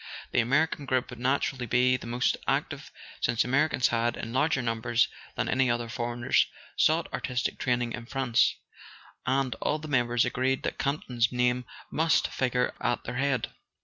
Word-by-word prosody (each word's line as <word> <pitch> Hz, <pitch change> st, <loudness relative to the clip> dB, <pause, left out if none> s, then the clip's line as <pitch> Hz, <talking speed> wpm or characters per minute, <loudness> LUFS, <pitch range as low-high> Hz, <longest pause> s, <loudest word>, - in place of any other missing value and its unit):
The -, -, +2 dB
American 140 Hz, +4 st, +1 dB
group 130 Hz, -2 st, 0 dB
would 120 Hz, -, -9 dB
naturally 130 Hz, 0 st, 0 dB
be 125 Hz, +2 st, +3 dB
the 125 Hz, -, -6 dB
most 120 Hz, +2 st, +1 dB
active, -, -, -1 dB, 0.3 s
since 115 Hz, -1 st, +2 dB
Americans 135 Hz, +1 st, +2 dB
had, 120 Hz, 0 st, 0 dB
in 115 Hz, -, -6 dB
larger 135 Hz, -1 st, +2 dB
num¬ 115 Hz, -1 st, -1 dB
bers 120 Hz, 0 st, +2 dB, 0.3 s
than -, -, -1 dB
any 130 Hz, -1 st, +2 dB
other 120 Hz, 0 st, 0 dB
foreigners, 120 Hz, 0 st, +1 dB, 0.3 s
sought 160 Hz, +2 st, +3 dB
artistic 125 Hz, -2 st, -2 dB
training 120 Hz, -2 st, 0 dB
in 115 Hz, -1 st, -7 dB
France; 130 Hz, -3 st, +2 dB, 0.7 s
and 130 Hz, -1 st, +1 dB
all 150 Hz, -, +1 dB
the 155 Hz, 0 st, -8 dB
members 120 Hz, -3 st, +2 dB
agreed 130 Hz, +2 st, 0 dB
that -, -, -3 dB
Campton's 125 Hz, -4 st, 0 dB
name 125 Hz, 0 st, +1 dB, 0.3 s
must 160 Hz, +1 st, +2 dB
figure 125 Hz, -1 st, 0 dB
at 120 Hz, -, 0 dB
their 125 Hz, +1 st, -5 dB
head. 135 Hz, -1 st, 0 dB
125 Hz, 165 wpm, -28 LUFS, 120-135 Hz, 0.7 s, be